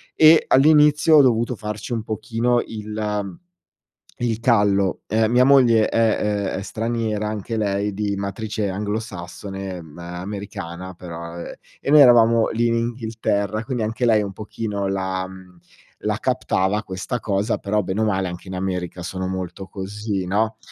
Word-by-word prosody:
E 155 0 +7
all'inizio 150 +2 +5
ho - - +9
dovuto 120 -1 +2
farci 105 +1 -6
un 115 -2 -1
pochino 115 +2 0
il 105 -2 -4 0.9
il 115 -2 0
callo. 105 -5 +2
Ehm, 110 +1 +1
mia 125 +1 +5
moglie 120 -5 +5
è, 105 -3 +1
ehm, - - -3
è 100 - -5
straniera 110 -1 -2
anche 110 +2 -4
lei 100 -1 -1
di 100 0 -2
matrice 100 +1 -3
anglosassone, 95 -1 -5
ehm, 80 -4 -11
americana 95 0 -6
però, 85 -1 -8
ehm, 85 - -7 0.3
e - - -2
noi 150 0 +8
eravamo 115 -3 +5
lì 120 +1 +1
in 115 - +2
Inghilterra 110 -3 -2
quindi, 125 -2 -2
anche 115 +3 -2
lei 110 -2 +4
un 100 -1 -5
pochino 105 -2 -4
la 95 -1 -2
mhmm, 95 -1 -14 0.5
la - - 0
captava 95 +3 0
questa 95 +6 -4
cosa 100 +1 0
però, 105 +1 -1
bene 95 +3 -2
o - - +3
male 95 -3 0
anche 90 +2 -8
in 95 - -6
America 90 -2 -3
sono 95 +1 -4
molto 95 0 -5
così, 100 0 -4
no, 110 +4 0
105 Hz, 155 wpm, -22 LUFS, 95-115 Hz, 0.9 s, ho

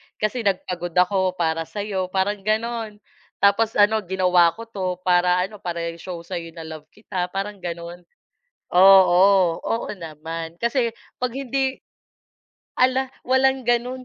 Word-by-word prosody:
Kasi 220 +3 -2
nagpagod 180 -3 -2
ako 185 0 +2
para 165 -1 -1
sa'yo, 195 0 -3
parang 195 +2 -1
gano'n. 220 +1 -2 0.4
Tapos 215 +3 +3
ano, 210 +1 +4
ginawa 180 -2 +3
ko 230 - -8
'to 205 -5 -6 0.2
para 180 0 +3
ano, 205 +2 -7
para 170 -4 -4
i-show 170 +1 -8
sa'yo 170 -2 -6
na 165 - -8
love 155 -1 -9
kita, 185 -2 -5
parang 200 0 -4
gano'n. 170 0 -6 0.8
Oo, 190 -1 +6
oo 230 - -2
naman. 165 0 -7
Kasi 235 0 0 0.3
'pag 250 - +1
hindi 270 0 -2 1.0
hala, 260 +1 +2 0.2
walang 265 +1 +2
gano'n. 245 +2 -1
190 Hz, 130 wpm, -22 LUFS, 175-225 Hz, 1.0 s, Oo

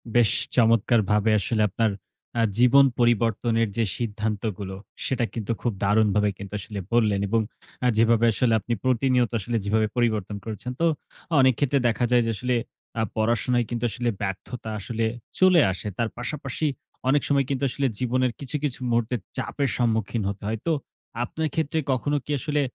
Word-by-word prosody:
বেশ 120 -3 +5 0.3
চমৎকারভাবে 110 -2 +3
আসলে 110 +2 0
আপনার 110 +3 +1 0.5
আ - - +4 0.2
জীবন 125 +3 +6
পরিবর্তনের 115 0 +2
যে, 115 - +3
সিদ্ধান্তগুলো, 105 -3 -3 0.3
সেটা 125 -3 0
কিন্তু 115 -2 -3
খুব 120 - 0
দারুণভাবে 105 0 +3
কিন্তু 100 0 -9
আসলে 100 +1 -6
বললেন 110 -4 +3
এবং 115 +3 +2 0.4
আ - - +5
যেভাবে 115 +1 +4
আসলে 115 +1 +2
আপনি 120 - -3
প্রতিনিয়ত 125 -1 +2
আসলে 115 +3 -2
যেভাবে 110 +1 +2
পরিবর্তন 110 -4 0
করেছেন। 110 +3 -5
তো - - +4 0.5
অনেক 130 -1 +6
ক্ষেত্রে 140 -1 +2
দেখা 120 +1 +1
যায় 120 -1 +5
যে, 115 - 0
আসলে 125 +4 -1 0.4
আ - - +2
পড়াশোনায় 120 +2 +1
কিন্তু 120 0 -3
আসলে 120 +3 -1
ব্যর্থতা 100 +4 -5
আসলে 115 +3 -2 0.3
চলে 185 -3 +6
আসে। 95 +2 -6
তার 115 -1 0
পাশাপাশি 135 +3 -4 0.4
অনেক 145 +2 +4
সময় 140 -1 +2
কিন্তু 140 0 -1
আসলে 135 +2 0
জীবনের 125 0 +1
কিছু, 140 0 -5
কিছু 140 -4 -2
মুহূর্তে 120 +1 +1 0.2
চাপের 140 -2 -1
সম্মুখীন 115 -2 0
হতে 100 0 -6
হয়। 110 +1 -2
তো - - +3 0.5
আপনার 160 +6 -2
ক্ষেত্রে 160 0 0
কখনো 145 +3 0
কি - - -5
আসলে 150 +2 0
115 Hz, 160 wpm, -25 LUFS, 110-125 Hz, 0.5 s, জীবন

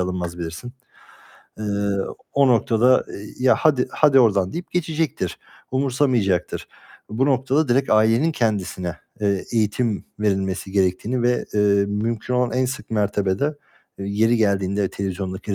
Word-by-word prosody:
alınmaz 90 -1 -3
bilirsin. 85 +9 -6 0.9
Eee, 110 - -5 0.7
o 140 -1 +4
noktada 120 +1 +3 0.4
"Ya 130 - +5
hadi, 140 -6 +2
hadi 140 -3 +4
oradan." 100 -5 +2
deyip 175 +1 -6
geçecektir, 160 -3 -2 0.3
umursamayacaktır. 125 -9 0 0.4
Bu 130 +6 +1
noktada 135 +2 +1
direkt 130 +3 +2
ailenin 115 +9 +3
kendisine, 95 - -2 0.2
eee, 100 -2 0
eğitim 110 0 0 0.2
verilmesi 95 -2 -1
gerektiğini 100 +6 0
ve, 120 0 +1
eee, 105 - +2 0.3
mümkün 110 +4 -2
olan 125 -2 +1
en 130 +1 +1
sık 125 -4 -6
mertebede 105 +5 0 0.4
yeri 105 +4 +1
geldiğinde 100 -2 +1
televizyondaki 95 0 -4
110 Hz, 120 wpm, -22 LUFS, 95-130 Hz, 0.9 s, Ya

